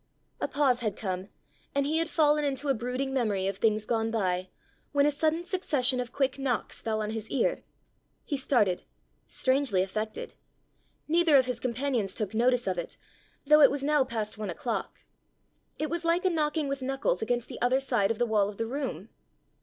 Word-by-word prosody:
A - - -1
pause 270 -4 +2
had 215 -5 -2
come, 185 -3 -4 0.5
and 280 0 +2
he 310 +3 +1
had 330 0 -1
fallen 300 -2 +3
into 280 0 -1
a - - +5
brooding 255 +3 -3
memory 210 -7 0
of 195 0 -2
things 215 0 +1
gone 225 -1 0
by, 185 -4 -1 0.4
when 285 0 +4
a 295 - +4
sudden 315 +3 0
succession 290 -9 +1
of 245 -1 -3
quick 275 0 0
knocks 260 -4 -2
fell 220 -1 -1
on 210 - -3
his 220 -1 -5
ear. 255 - 0 0.6
He 290 - -2
started 235 -9 +2 0.5
strangely 260 -8 +2
affected. 215 +3 -4 0.7
Neither 325 -2 +5
of 260 - +4
his 250 -2 -3
companions 245 -4 -1
took 210 -1 -3
notice 245 +2 +2
of 185 -2 -1
it, 170 - -6 0.5
though 300 +1 +6
it 280 - +9
was 280 0 -3
now 295 -1 +3
past 220 -5 -4
one 210 -2 -3
o'clock. 225 +6 -4 0.8
It 310 0 -2
was 340 0 -1
like 335 +2 +1
a 370 - +4
knocking 305 -2 0
with 275 0 -3
knuckles 270 -7 -1
against 240 +1 -1
the - - -9
other 250 +2 +3
side 240 -7 +2
of 230 - -1
the 240 - +2
wall 210 -3 +2
of 205 - -9
the 225 - -1
room. 235 - -4
250 Hz, 195 wpm, -28 LUFS, 215-285 Hz, 0.8 s, it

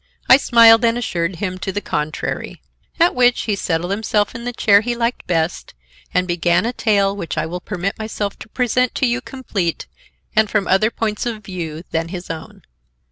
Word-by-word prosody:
I 260 - +9
smiled 230 -3 +6
and 230 0 +3
assured 175 -6 -2
him 185 +1 -4
to 195 - -3
the 205 - -2
contrary. 155 -5 -4 0.4
At 340 +2 +4
which 245 -1 +3
he 210 - -1
settled 175 -1 -2
himself 210 0 0
in 235 +1 -7
the 245 - -2
chair 205 -4 +4
he 240 +2 -2
liked 235 +1 -2
best 165 -1 -1 0.4
and 180 0 +1
began 175 +2 +1
a 240 - -1
tale 200 -4 +1
which 170 -5 -5
I 155 - 0
will 175 +3 -5
permit 195 +1 -4
myself 215 -2 -4
to - - -11
present 250 +1 0
to 265 - +1
you 245 +1 0
complete 210 -11 -3 0.5
and 215 -1 +3
from 205 -3 0
other 195 +4 +3
points 220 0 -2
of 220 -3 -5
view 170 -4 -6
than 165 0 -1
his 175 -1 -6
own. 160 - -9
205 Hz, 190 wpm, -19 LUFS, 175-230 Hz, 0.5 s, I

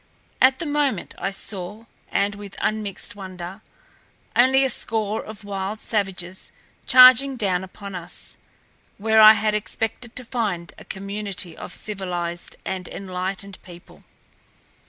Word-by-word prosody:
At 260 0 +6
the 340 - -2
moment 290 - 0
I - - -1
saw, 200 +2 -6 0.3
and 200 +1 +1
with 200 -1 -10
unmixed 215 -2 -2
wonder, 185 0 -8 0.7
only 260 +2 +5
a - - +1
score 220 -2 -1
of 215 -1 -10
wild 200 +1 -4
savages 190 -5 -3 0.4
charging 255 +1 +8
down 190 -5 0
upon 200 +1 -9
us, 175 -2 -7 0.6
where 220 +1 +4
I 215 0 +11
had 215 -1 +1
expected 225 +3 -2
to 255 - -6
find 205 -9 -2
a - - -13
community 195 -3 -5
of - - -8
civilized 175 -4 -4
and 185 -2 -3
enlightened 190 +1 -4
people. 175 -1 -14
200 Hz, 130 wpm, -23 LUFS, 185-220 Hz, 0.7 s, I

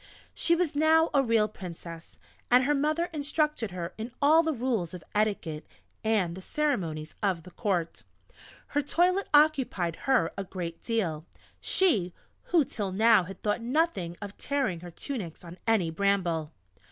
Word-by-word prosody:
She 340 - +3
was 340 -4 0
now 320 +2 +4
a 280 - +5
real 225 -4 +3
Princess, 170 -4 -9 0.3
and 250 +1 +6
her 290 +3 +2
mother 305 +4 +1
instructed 300 -5 0
her 175 -1 -5
in 225 +3 -5
all 310 +3 +6
the 320 -1 0
rules 230 - -2
of 175 - -10
etiquette 200 -8 -1 0.4
and 210 -6 +1
the 190 - -8
ceremonies 175 - -2
of 185 -5 0
the 180 - -13
Court. 180 -6 -2 0.7
Her 290 - +1
toilet 360 +7 +1
occupied 265 - +3
her 260 -3 +3
a 195 - -3
great 175 -3 -6
deal 175 -9 -2 0.3
she, 210 - +2 0.3
who 330 -5 +3
till 205 -6 -4
now 220 -1 +5
had 190 +1 -10
thought 210 +2 0
nothing 235 - 0
of 205 0 -8
tearing 270 - -1
her 175 +1 -9
tunics 185 - -6
on 175 +1 -11
any 200 -8 +2
bramble! 175 -4 0
215 Hz, 155 wpm, -28 LUFS, 175-285 Hz, 0.7 s, and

